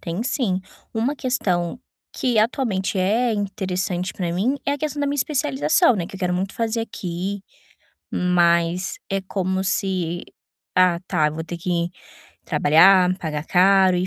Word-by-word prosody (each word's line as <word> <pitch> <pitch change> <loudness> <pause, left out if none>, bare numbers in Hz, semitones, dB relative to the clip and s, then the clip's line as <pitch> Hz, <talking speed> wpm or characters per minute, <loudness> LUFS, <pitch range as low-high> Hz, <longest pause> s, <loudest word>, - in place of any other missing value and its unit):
tem 170 +5 -3
sim. 230 -7 -1 0.3
uma 240 +6 0
questão 195 -7 -1 0.3
que 245 -4 0
atualmente 215 -4 0
é 225 +6 +2
interessante 190 -3 -2
pra 175 -3 -3
mim 220 +11 0
é 280 - +2
a 285 - -3
questão 295 0 -3
da 285 - +1
minha 280 - -1
especialização, 235 - +2
né, 175 -3 -2
que - - -12
eu - - -10
quero 180 -2 0
muito 190 +2 -2
fazer 230 0 -1
aqui, 195 -2 -4 0.7
mas, 175 0 +1
é 195 0 0
como 190 0 -2
se: 185 -3 -1 0.5
"Ah, 180 -2 +4
tá, 150 -3 +1
vou 160 +2 -5
ter 175 - -6
que 170 0 -1 0.5
trabalhar, 180 +4 +5
pagar 150 -3 -4
caro 190 0 +4
e 180 +1 0
185 Hz, 155 wpm, -22 LUFS, 175-220 Hz, 0.7 s, trabalhar